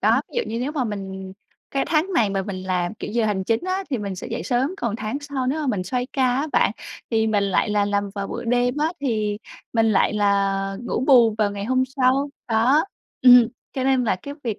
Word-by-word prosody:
Đó, - - +3
ví - - -9
dụ 475 - +1
như 230 - -3
nếu 275 +4 -2
mà 275 -5 -1
mình 190 -3 -6 0.4
cái 275 - 0
tháng 335 +5 +1
này 220 - +2
mà 195 -1 -1
mình 185 -2 -6
làm, 180 +1 -1
kiểu, - - -7
giờ 235 -1 +1
hành 190 -3 -1
chính 225 +3 +1
á 375 +1 -2
thì 255 - 0
mình 200 -2 -4
sẽ - - -7
dậy 230 - -4
sớm, 265 +6 0
còn 225 -2 -2
tháng 215 +6 -3
sau 280 -3 -3
nếu 300 +4 0
mà 295 - -2
mình 205 -8 -1
xoay 245 +5 -2
ca 270 - 0
á 285 +4 0
bạn - - +3 0.4
thì 220 -1 +2
mình 205 -2 +1
lại 200 +2 +1
là 205 -1 +2
làm 200 0 -1
vào 200 -1 -3
buổi - - -5
đêm 245 +2 +1
á 310 +3 0
thì 215 -6 -1 0.3
mình 225 -1 +3
lại 195 - +3
là 195 -1 +1
ngủ 245 - -2
bù 235 -6 +6
vào 210 -2 +2
ngày 200 0 -5
hôm 255 +3 +2
sau. 270 +2 +2 0.2
Đó, 245 +8 +3 0.4
ừm, 245 -2 +8 0.2
cho 260 -1 -2
nên 265 -2 +2
là 205 - +1
cái 280 +10 -8
việc 225 -4 -2
225 Hz, 245 wpm, -22 LUFS, 200-265 Hz, 0.4 s, ừm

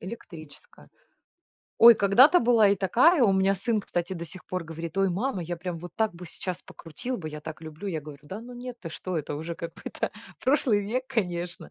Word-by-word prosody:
электрическая. 170 -7 -11 0.9
Ой, 235 0 +10
когда-то 250 - +6
была 230 -3 +5
и 200 - +3
такая. 255 - +4
У 195 - +4
меня 190 +1 +3
сын, 215 +2 0
кстати, 175 -1 -3
до 170 -2 -5
сих 180 +3 -11
пор 185 -1 -3
говорит: 165 +2 -7
"Ой, 195 -1 +3
мама, 195 +1 -1
я 175 +1 -4
прям 175 -1 -5
вот 175 0 -9
так 220 -4 +1
бы 180 +1 -10
сейчас 180 +2 -5
покрутил 245 +10 -6
бы, 155 -4 -6
я 150 0 -7
так 160 +1 -8
люблю". 160 +5 -7
Я 160 -4 -2
говорю: 145 -1 -11
"Да 190 +9 -7
ну, 245 +1 -10
нет, 245 0 -7
ты 165 - -6
что?" 180 +1 -3
Это 150 -1 -4
уже 160 +3 -5
какой-то 170 - -5 0.3
прошлый 255 -6 +2
век, 250 +6 -2
конечно. 175 -5 -3
185 Hz, 205 wpm, -27 LUFS, 165-225 Hz, 0.9 s, Ой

